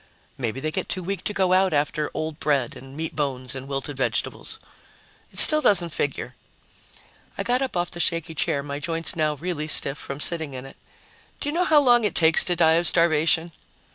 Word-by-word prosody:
"Maybe 125 0 -4
they 155 +3 -3
get - - -4
too 185 - -4
weak 195 0 -5
to - - -1
go 190 -2 +1
out 185 -1 +2
after 150 +1 -1
old 155 -1 -5
bread 140 -5 -1
and 135 +2 -12
meat 160 0 -5
bones 130 -4 -3
and 135 0 -7
wilted 135 0 -5
vegetables." 125 -4 -3 0.7
"It - - -12
still 305 0 +9
doesn't 175 - +2
figure." 135 -4 -4 1.0
I - - -3
got 245 +2 0
up 260 -8 -3
off 175 0 -2
the 175 - -8
shaky 165 -1 0
chair, 140 -2 -1
my 140 0 -6
joints 165 +1 -2
now 155 -2 0
really 155 0 -5
stiff 140 -2 +1
from 140 +1 -7
sitting 160 -3 +1
in 130 +1 -8
it. 135 - -13 0.6
"Do 290 - -3
you - - -4
know 360 +2 +1
how 305 -3 +4
long 240 -3 +4
it 210 - -1
takes 160 0 +4
to 175 - 0
die 160 -1 +3
of 175 - +2
starvation?" 165 0 +2
160 Hz, 205 wpm, -23 LUFS, 140-175 Hz, 1.0 s, still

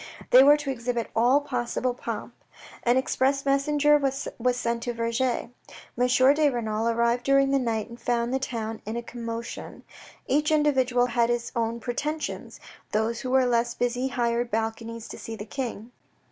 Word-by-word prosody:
They 255 +1 +9
were 290 +2 +7
to 290 -2 -3
exhibit 240 -2 -3
all 245 +5 +4
possible 250 -2 -2
pomp. 245 - -6 0.5
An 240 +1 +3
express 270 +1 +1
messenger 295 +2 +3
was 275 -1 -2 0.3
sent 235 -1 -1
to 240 0 -3
Vergy. 230 +1 -1 0.4
M. 255 +2 +4
de 300 -1 +3
Renal 225 -3 -2
arrived 235 +1 +1
during 275 0 +3
the 275 - +3
night 225 -4 -1
and 235 +1 -12
found 240 0 0
the 265 - +1
town 225 -4 -4
in 220 +2 -3
a 235 - -4
commotion. 230 -1 -7 0.4
Each 295 +3 +1
individual 260 -5 +3
had 235 -1 +1
his 240 0 -1
own 230 0 -1
pretensions; 295 +6 -4 0.3
those 220 +2 0
who 255 - -4
were 260 0 +4
less 240 -1 +1
busy 245 +1 0
hired 240 -1 -1
balconies 225 +1 -3
to - - -8
see 225 - -6
the 210 - -7
King. 235 -2 -5
245 Hz, 165 wpm, -26 LUFS, 230-265 Hz, 0.5 s, They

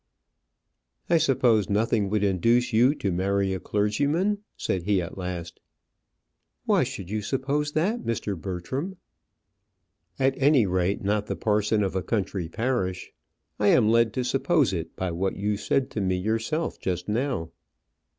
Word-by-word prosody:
"I 170 - +5
suppose 125 - +3
nothing 105 0 +1
would 105 0 0
induce 115 +6 +2
you 125 +6 +4
to 100 - -2
marry 95 +2 0
a 95 - -3
clergyman?" 145 - 0 0.2
said 95 - -1
he 100 +2 +1
at 85 -2 -5
last. 90 -2 -6 1.1
"Why - - +3
should 95 0 -6
you 105 0 -1
suppose 140 +6 -1
that, 200 +10 0
Mr. 110 -3 -2
Bertram?" 100 - -4 1.2
"At 135 0 +2
any 140 -4 +5
rate, 95 +1 0
not 105 +1 0
the - - -2
parson 105 0 +1
of 95 -1 -2
a 95 - +1
country 95 -3 -2
parish. 105 -4 -2 0.5
I 105 - +2
am 110 0 +5
led 115 0 +4
to 130 - -1
suppose 135 - +2
it 80 -2 -4
by 95 -1 -2
what 95 +3 -1
you 105 +1 0
said 130 +5 0
to 105 - -2
me 95 -1 +1
yourself 115 - -2
just 90 -1 -3
now." 115 - -1
105 Hz, 150 wpm, -26 LUFS, 95-130 Hz, 1.2 s, I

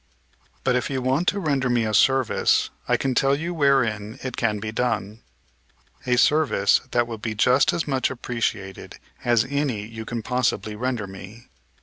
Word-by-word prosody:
"But, 125 -1 +2
if 125 - -1
you 135 -1 -1
want 135 +7 0
to 205 - +2
render 140 -7 0
me 120 -2 +2
a 110 - -2
service, 130 +4 +3 0.2
I - - +3
can 135 -1 -1
tell 135 +2 +3
you 165 +4 -4
wherein 115 -9 +1
it 130 -2 -4
can 110 -3 0
be 110 +1 -5
done, 110 -2 -2 0.9
a 125 0 +2
service 145 -7 +3
that 120 -1 +2
will 115 -2 -7
be 110 0 -4
just 130 +7 +4
as 170 -2 -2
much 135 -2 0
appreciated 115 -6 -4 0.3
as 120 -1 +3
any 135 -7 -1
you 110 0 -8
can 115 -1 -4
possibly 115 -4 -1
render 120 -1 -2
me. 95 +4 -12
120 Hz, 170 wpm, -23 LUFS, 110-135 Hz, 0.9 s, just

